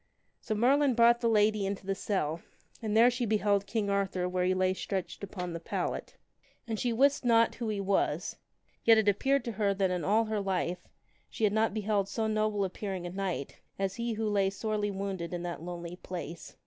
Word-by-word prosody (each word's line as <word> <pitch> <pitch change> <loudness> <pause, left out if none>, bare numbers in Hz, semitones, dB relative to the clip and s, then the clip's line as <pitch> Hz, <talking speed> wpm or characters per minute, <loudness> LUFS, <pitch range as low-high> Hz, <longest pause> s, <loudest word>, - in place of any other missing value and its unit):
So 215 - -3
Merlin 265 +4 +3
brought 235 0 +5
the 235 - +2
lady 210 -1 +3
into 195 0 -3
the 195 - 0
cell, 170 -5 -2 0.4
and 220 -1 0
there 240 +2 +7
she 245 0 -2
beheld 205 -2 +1
King 215 -1 -1
Arthur 195 -2 0
where 180 0 0
he 185 +1 +2
lay 185 0 +2
stretched 190 0 -4
upon 180 -3 -5
the 170 - -4
pallet. - - -4 0.5
And 220 -2 -3
she 245 - 0
wist 275 +5 +3
not 230 -1 +4
who 235 -3 -4
he 210 -2 -2
was. 195 0 0 0.5
Yet 225 -1 +7
it 220 -1 +2
appeared 270 +8 +2
to 235 - -2
her 200 -2 0
that 190 -1 +1
in 180 -1 -1
all 220 +3 +3
her 215 -1 -1
life 180 -2 -2 0.4
she - - -6
had 205 -1 +4
not 220 +1 +2
beheld 205 -2 0
so 225 +2 -1
noble 215 -2 +1
appearing 190 -1 -4
a 175 - -4
knight 185 -7 -4 0.2
as 195 0 -2
he 235 0 -1
who 220 0 -2
lay 200 -2 +2
sorely 210 +1 -2
wounded 190 -3 -4
in 175 - -4
that 175 -2 -5
lonely 175 0 -6
place. 175 -3 -7
200 Hz, 205 wpm, -30 LUFS, 185-220 Hz, 0.5 s, there